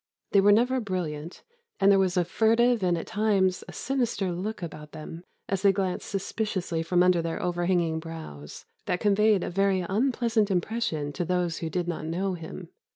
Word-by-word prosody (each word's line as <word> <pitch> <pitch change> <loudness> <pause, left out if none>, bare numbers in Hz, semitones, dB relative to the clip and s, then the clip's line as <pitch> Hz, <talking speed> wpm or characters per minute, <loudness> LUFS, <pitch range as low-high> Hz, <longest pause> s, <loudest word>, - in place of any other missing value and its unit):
They 200 - +5
were 205 +1 +6
never 250 +5 +3
brilliant, 170 -7 -4 0.4
and 195 - +5
there 195 - +5
was 185 -1 +1
a 175 - +3
furtive 230 +4 +3
and 175 -2 +2
at 165 - -4
times 195 -4 +1
a - - -8
sinister 240 -8 -1
look 190 +3 -4
about 150 -2 -8
them, 165 +2 -8 0.2
as 195 -2 -1
they 200 -1 +6
glanced 190 -2 -2
suspiciously 195 -4 -2
from 180 +2 +2
under 180 -2 +4
their 165 0 -3
overhanging 175 -2 0
brows, 160 - -9 0.2
that 180 - 0
conveyed 210 -1 +3
a - - -3
very 195 0 +2
unpleasant 225 +2 +1
impression 175 -6 -1
to 175 - -2
those 175 -1 -1
who 165 - -3
did 175 +1 -2
not 160 -2 -3
know 185 +4 -1
him. 165 +1 -8
185 Hz, 180 wpm, -27 LUFS, 170-205 Hz, 0.4 s, were